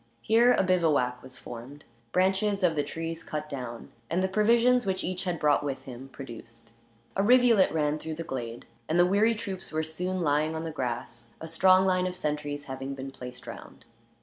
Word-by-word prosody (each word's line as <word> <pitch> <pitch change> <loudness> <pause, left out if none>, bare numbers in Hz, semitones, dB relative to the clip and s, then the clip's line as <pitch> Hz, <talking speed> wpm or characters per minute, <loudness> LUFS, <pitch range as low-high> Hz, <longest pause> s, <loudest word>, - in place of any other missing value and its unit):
Here 235 +3 +5
a - - +2
bivouac 155 -9 +2
was 130 -1 -10
formed, 125 +5 -10 0.3
branches 195 +2 +2
of 170 -3 +3
the 145 - +2
trees 165 +3 -5
cut 150 -1 -5
down, 125 -5 -7 0.2
and 175 +3 +1
the - - +2
provisions 235 +5 +4
which 190 -2 -1
each 185 +1 -3
had 175 -2 -1
brought 150 -1 +3
with 140 -2 -4
him 130 +1 -9
produced. 115 -3 -11 0.4
A 195 - +2
rivulet 235 -2 +5
ran 150 -1 0
through 160 0 -5
the 165 - -5
glade, 120 -7 -5 0.2
and 160 - +2
the 175 - +6
weary 210 +5 +3
troops 195 -4 -6
were 155 0 -1
soon 180 +4 -2
lying 155 +1 +1
on 160 - -3
the 165 - -4
grass, 120 -3 -4
a 160 - -7
strong 185 +3 +5
line 185 -1 +2
of 180 - -4
sentries 150 -3 -3
having 135 +1 -5
been 135 0 -6
placed 125 -1 -10
round. - - -10
160 Hz, 195 wpm, -28 LUFS, 135-185 Hz, 0.4 s, the